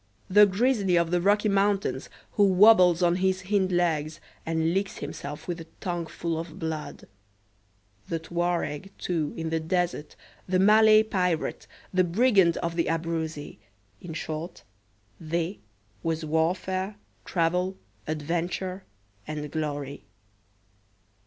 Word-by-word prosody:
The 210 +2 +8
grizzly 200 -2 +2
of 170 0 +1
the 175 -1 +2
Rocky 205 +3 +3
Mountains, 200 0 +1 0.2
who 205 - +2
wobbles 185 -3 +6
on 175 0 +3
his 190 0 0
hind 190 -1 +1
legs, 160 -3 0 0.3
and 165 0 +1
licks 195 +1 -1
himself 145 0 -7
with 175 -1 -4
a 165 - -11
tongue 175 -2 -3
full 165 -1 -3
of 165 +1 -7
blood. 160 -3 -5 1.1
The 165 - 0
Touareg, 175 0 -2
too, 160 -5 -2
in 160 0 -3
the 165 - +1
desert, 175 -1 -2 0.3
the 185 0 +2
Malay 215 +2 +6
pirate, 180 -6 -1 0.3
the 185 0 +4
brigand 190 -2 +3
of 170 0 -2
the 170 - 0
Abruzzi 160 -5 -3 0.4
in 165 -3 -7
short, 160 +2 -5 0.6
"they" 170 +4 -2 0.4
was 160 -1 -2
warfare, 185 +5 -1 0.3
travel, 180 +2 0 0.3
adventure, 175 +5 -3 0.4
and 150 -1 -5
glory. 145 -4 -4
175 Hz, 125 wpm, -27 LUFS, 160-190 Hz, 1.1 s, The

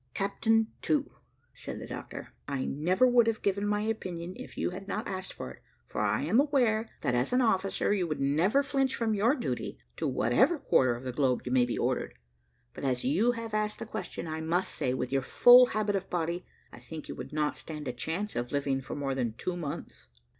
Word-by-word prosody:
"Captain 225 +3 +2 0.2
To," 290 -2 0 0.4
said - - -7
the - - -7
doctor, - - -8
"I 140 -2 -2
never 180 - +2
would 245 -2 +5
have 225 -1 -1
given 200 +1 +1
my 210 0 +1
opinion, 185 -5 -3
if - - -10
you - - 0
had 195 +2 -8
not 210 +3 -3
asked 190 -1 -5
it, 65 - -7 0.3
for - - -4
I 105 +4 +1
am 190 - +3
aware, 245 -6 +2
that, 125 - 0
as 125 +2 +1
an 250 - +4
officer, 195 -3 +1
you 185 -4 0
would 155 - -3
never 165 - +3
flinch 270 -1 0
from 225 -2 0
your 220 +7 +3
duty, 245 - -3 0.2
to - - -1
whatever 345 - +3
quarter 130 - +3
of 120 - -9
the 130 - -3
globe 130 -1 +1
you 125 - -3
may 125 -1 +4
be 120 - -3
ordered; - - -1 0.6
but - - -9
as 130 -2 0
you 210 - +3
have 230 -2 -6
asked 210 0 0
the - - -6
question, 215 -5 -5
I 160 0 -4
must 170 +4 0
say, 125 - -1
with 125 -1 -3
your 135 0 +2
full 245 - +8
habit 215 -2 0
of 195 -1 -3
body, 170 0 -2 0.3
I - - -10
think 160 -2 -9
you - - -5
would - - -8
not 150 0 0
stand 150 -2 -7
a 125 - -2
chance 165 +11 -3
of 120 0 -2
living 140 -2 0
for - - -6
more 140 -2 -2
than 120 -4 -1
two 180 +8 -3
months. 165 -2 -6
180 Hz, 220 wpm, -30 LUFS, 140-220 Hz, 0.6 s, full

